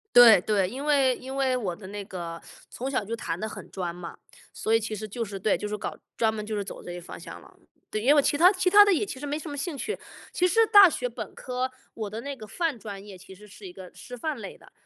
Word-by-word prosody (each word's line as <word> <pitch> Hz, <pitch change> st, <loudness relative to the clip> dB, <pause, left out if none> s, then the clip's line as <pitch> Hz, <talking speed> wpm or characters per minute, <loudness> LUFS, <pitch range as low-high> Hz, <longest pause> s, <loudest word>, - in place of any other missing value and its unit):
对 235 Hz, -5 st, +10 dB
对， 195 Hz, -2 st, +1 dB
因 270 Hz, +6 st, -6 dB
为 275 Hz, -4 st, +4 dB
因 265 Hz, +1 st, -7 dB
为 260 Hz, -2 st, +2 dB
我 190 Hz, -8 st, -3 dB
的 190 Hz, +1 st, -11 dB
那 205 Hz, 0 st, -6 dB
个 170 Hz, -3 st, -6 dB, 0.3 s
从 260 Hz, +3 st, -4 dB
小 255 Hz, -6 st, 0 dB
就 225 Hz, +3 st, -4 dB
弹 170 Hz, -7 st, -4 dB
得 220 Hz, -, -3 dB
很 -, -, -10 dB
专 180 Hz, -3 st, -3 dB
嘛， 175 Hz, -1 st, -8 dB, 0.4 s
所 220 Hz, -, -3 dB
以 225 Hz, -, +5 dB
其 220 Hz, -1 st, -4 dB
实 215 Hz, +1 st, -6 dB
就 230 Hz, +3 st, -4 dB
是 200 Hz, -1 st, -7 dB
对， 200 Hz, -, +2 dB
就 210 Hz, -, -4 dB
是 210 Hz, -, -3 dB
搞 -, -, -5 dB, 0.2 s
专 225 Hz, -1 st, +2 dB
门 215 Hz, -1 st, -5 dB
就 215 Hz, 0 st, -3 dB
是 205 Hz, -, -1 dB
走 -, -, -9 dB
这 175 Hz, -, -7 dB
个 175 Hz, -, -7 dB
方 175 Hz, -, -10 dB
向 -, -, -10 dB
了。 -, -, -19 dB, 0.3 s
对， 215 Hz, -, -2 dB
因 235 Hz, -, -3 dB
为 -, -, +9 dB
我 295 Hz, -, +6 dB
其 285 Hz, -, +1 dB
他 355 Hz, +4 st, +7 dB
其 370 Hz, -2 st, +1 dB
他 410 Hz, +2 st, +9 dB
的 405 Hz, -, +4 dB
也 355 Hz, -, +1 dB
其 285 Hz, -10 st, -6 dB
实 290 Hz, -, -5 dB
没 290 Hz, +1 st, -2 dB
什 315 Hz, -, -7 dB
么 285 Hz, -, -6 dB
兴 300 Hz, +3 st, -3 dB
趣， 425 Hz, -, -3 dB, 0.3 s
其 360 Hz, -, +2 dB
实 450 Hz, +5 st, +4 dB
大 405 Hz, -3 st, +9 dB
学 250 Hz, -7 st, -2 dB
本 235 Hz, -, -7 dB
科， 255 Hz, 0 st, -3 dB, 0.2 s
我 220 Hz, -2 st, -4 dB
的 220 Hz, +3 st, -6 dB
那 280 Hz, +2 st, -5 dB
个 220 Hz, -5 st, -10 dB
泛 315 Hz, -, -2 dB
专 200 Hz, -3 st, -8 dB
业 200 Hz, -2 st, -11 dB
其 185 Hz, +1 st, -13 dB
实 210 Hz, +3 st, -15 dB
是 200 Hz, 0 st, -13 dB
一 180 Hz, -, -11 dB
个 185 Hz, -1 st, -11 dB
师 250 Hz, -, -10 dB
范 295 Hz, +4 st, -3 dB
类 205 Hz, -4 st, -8 dB
的。 -, -, -19 dB
225 Hz, 310 characters per minute, -27 LUFS, 200-285 Hz, 0.4 s, 对